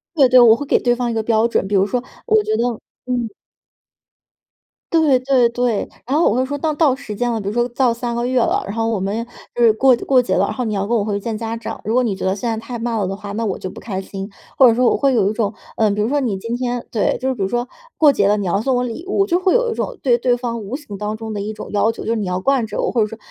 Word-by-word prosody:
对 275 -5 +5
对， 255 0 +7
我 230 -2 +7
会 285 - -5
给 - - +3
对 245 -1 +2
方 245 0 -2
一 - - -2
个 220 -1 -1
标 225 0 +2
准， 230 - 0
比 205 - -5
如 195 -1 +4
说 245 +4 -2 0.2
我 435 -2 +4
觉 430 +1 0
得 - - 0 0.4
嗯。 245 -2 -1 1.6
对 305 -5 +4
对 255 -2 +3
对， 235 -2 -1 0.2
然 265 - -1
后 325 - +4
我 210 - 0
会 255 +1 +1
说 285 +2 -4
当 305 +1 -1
到 290 -4 +3
时 230 -6 -8
间 240 +3 -1
了， 225 -2 -2
比 195 - -6
如 - - 0
说 240 +2 +1
到 245 0 +2
3 235 0 -3
个 240 +1 -1
月 255 0 +1
了， 230 - +1
然 200 - -5
后 225 0 0
我 220 -3 -1
们 205 +5 -2 0.3
就 240 - +1
是 225 -2 +6
过 260 +3 +4
过 260 -2 +4
节 245 - -1
了， - - +3
然 - - -3
后 255 - -3
你 215 -2 -2
要 195 0 -1
跟 235 +4 0
我 215 - +1
回 205 -1 -2
去 - - -1
见 225 +2 -4
家 225 +1 -4
长， 230 - -7
如 220 - -1
果 255 - +3
你 215 -5 -1
觉 - - -7
得 190 +1 +1
现 225 +4 -4
在 225 - 0
太 245 - -6
慢 235 0 -2
了 195 - 0
的 195 - -3
话， 200 0 -8
那 225 +3 -3
我 200 -4 -2
就 185 - -6
不 - - -11
开 195 -4 -4
心。 195 +1 -7 0.3
或 260 - +7
者 230 - +4
说 250 +1 +2
我 - - +4
会 275 -2 +2
有 205 -2 +2
一 - - -4
种， 215 -2 -1 0.3
呃， 220 -1 +3
比 205 +1 -2
如 210 - +1
说 290 +2 +1
你 235 -8 -1
今 230 +5 -4
天 245 -1 -3
对， 215 -4 +1
就 265 +1 -1
比 225 - -7
如 190 - +1
说 240 +4 -2 0.3
过 295 -3 +5
节 200 -5 +2
了， 205 +1 +3
你 205 - -3
要 195 +3 0
送 260 +2 +1
我 245 - +1
礼 250 +6 -5
物， 395 0 +2
就 355 -2 +1
会 370 +3 +2
有 485 -1 +2
一 - - -1
种 - - -4
对 250 -3 +4
对 245 0 +2
方 235 -2 -4
无 210 +5 -5
形 285 -8 -8
当 210 +1 -3
中 220 -1 -6
的 205 - -3
一 215 +2 -4
种 - - -9
要 210 +2 +2
求， - - -8
就 - - -3
是 - - +1
你 210 -4 -2
要 180 0 -1
惯 255 +1 +1
着 210 - -5
我， - - 0
或 235 - +1
者 210 - +2
说 225 +1 -9
235 Hz, 340 characters per minute, -19 LUFS, 210-255 Hz, 1.6 s, 对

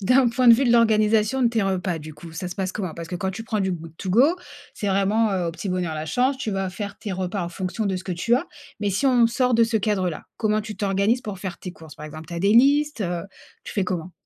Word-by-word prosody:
d'un 250 +5 +4
point 250 0 +3
de 230 - +10
vue 275 - +1
de 240 - +3
l'organisation 220 +1 +3
de 235 - +5
tes 230 -1 0
repas, 185 -3 -1
du 155 0 -9
coup 160 +2 -11
ça 175 +2 -5
se 180 - -7
passe 190 -2 -2
comment? 185 -6 -4
Parce 165 0 -7
que 180 - -5
quand 190 +2 -2
tu 225 +4 -7
prends 220 -2 -1
du 190 -1 0
good 165 -2 -8
to 190 - -5
go 235 +8 +6 0.5
c'est 205 - -4
vraiment, 200 +3 +2
heu, 180 -3 0
au - - -4
petit 180 +4 -6
bonheur 180 -3 -1
la 155 0 -4
chance. 260 - +1
Tu 240 -4 -3
vas 195 -1 -2
faire 200 +2 -6
tes 205 - -5
repas 185 +1 -2
en 170 - -3
fonction 190 +5 -3
de 190 - 0
ce 180 - -6
que 185 - -3
tu 230 +8 +1
as. 315 - -3 0.3
Mais 205 - 0
si 200 +9 -1
on 245 -3 +5
sort 250 +2 +1
de 230 - +5
ce 230 0 0
cadre 200 -3 0
là, 155 - -8
comment 215 -1 +1
tu 215 -2 -7
t'organises 200 +4 +1
pour 205 -3 -6
faire 180 -3 -5
tes 180 - -7
courses 160 -3 -13
par 150 - -8
exemple? 155 +1 -9
Tu - - -9
as 170 - -3
des 200 +4 +3
listes? 285 0 +4
Heu, 175 -1 -2 0.4
tu - - -7
fais 200 - +1
comment? 180 -1 -4
195 Hz, 290 wpm, -23 LUFS, 180-230 Hz, 0.5 s, de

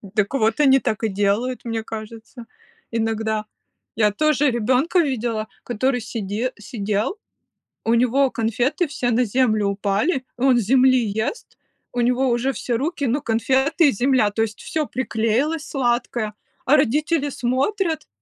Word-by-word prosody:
Так 210 +2 +1
вот, 225 -1 +1
они 270 -2 +5
так 220 -3 -2
и 220 - +1
делают, 205 +6 -1
мне 225 -1 -3
кажется. 225 +2 -9 0.5
Иногда. 220 -1 -1 0.5
Я 210 -2 +3
тоже 295 +5 +2
ребенка 255 - +1
видела, 235 -7 -1 0.2
который 245 +2 0
сиде 220 +2 -3
сидел, 210 - -2 0.7
у 225 - +1
него 255 +3 +3
конфеты 240 - 0
все 255 -4 -2
на 245 +2 +3
землю 215 -2 +1
упали, 205 - 0
и - - -8
он 260 -2 +4
с - - +2
земли 255 +4 +4
ест, 220 - -4 0.4
у 245 - 0
него 250 +2 +2
уже 240 +3 +1
все 255 - -4
руки, 290 +4 -2
ну 265 +4 0
конфеты 265 +6 +2
и - - +2
земля, 250 -2 +2
то 220 - -1
есть 220 -1 -2
всё 310 -2 -2
приклеилось 255 +6 -1
сладкое, 240 -4 -1 0.3
а 275 - +5
родители 295 +3 +1
смотрят, 305 - -1
245 Hz, 150 wpm, -22 LUFS, 220-270 Hz, 0.7 s, они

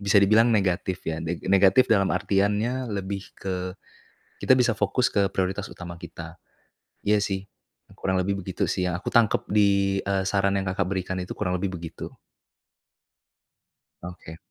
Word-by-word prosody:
bisa 100 0 +2
dibilang 110 +4 +5
negatif 95 -4 0
ya. 80 0 -3
Ne 85 +1 -3
negatif 100 +6 +5
dalam 95 -2 +3
artiannya, 105 +6 0
lebih 100 -1 -4
ke, 95 -1 -3 0.8
kita 130 0 +5
bisa 120 -2 +3
fokus 105 +4 +1
ke 100 -2 +1
prioritas 95 +3 -2
utama 85 -1 -8
kita. 85 0 -9 0.7
Iya 105 +1 +4
sih, 95 -1 -3 0.5
kurang 95 -1 0
lebih 100 +2 -1
begitu 95 -1 -2
sih 90 -1 0
yang 90 - -1
aku - - -4
tangkap 115 -3 +3
di, 100 -1 +3
eee, 100 -1 0
saran 100 -1 +1
yang 95 0 -2
Kakak 90 -1 -1
berikan 95 -1 -2
itu, 90 - -6
kurang 90 -3 -1
lebih 95 0 -3
begitu. 85 -1 -8 1.9
Oke. 85 -2 -9
95 Hz, 155 wpm, -25 LUFS, 90-100 Hz, 1.9 s, dibilang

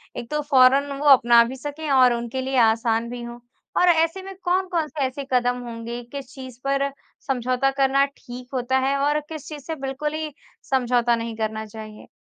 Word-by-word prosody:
एक 235 - -6
तो 300 - 0
फौरन 275 0 +4
वो 295 - -4
अपना 240 -3 +7
भी 250 +3 -5
सकें 290 +3 -6
और 255 -2 +5
उनके 235 +2 -3
लिए 265 0 -2
आसान 230 0 +2
भी 245 0 -6
हो? 235 0 -7 0.4
और 360 - +4
ऐसे 330 +2 +2
में 390 +1 -8
कौन-कौन 360 -3 0
से 290 -3 -2
ऐसे 260 +2 -4
कदम 245 0 +2
होंगे? 235 +1 -6
किस 265 +2 -9
चीज़ 260 -3 -10
पर 275 0 +1 0.4
समझौता 255 0 +1
करना 275 0 +3
ठीक 250 -3 -11
होता 260 0 0
है? 270 +1 +1
और 290 +2 +1
किस 310 -3 -8
चीज़ 295 -3 -8
से 320 - -4
बिल्कुल 275 +2 -4
ही 310 -1 -4 0.4
समझौता 245 -2 +2
नहीं 230 0 -5
करना 220 0 -3
चाहिए? 215 0 -11
265 Hz, 190 wpm, -23 LUFS, 240-285 Hz, 0.4 s, अपना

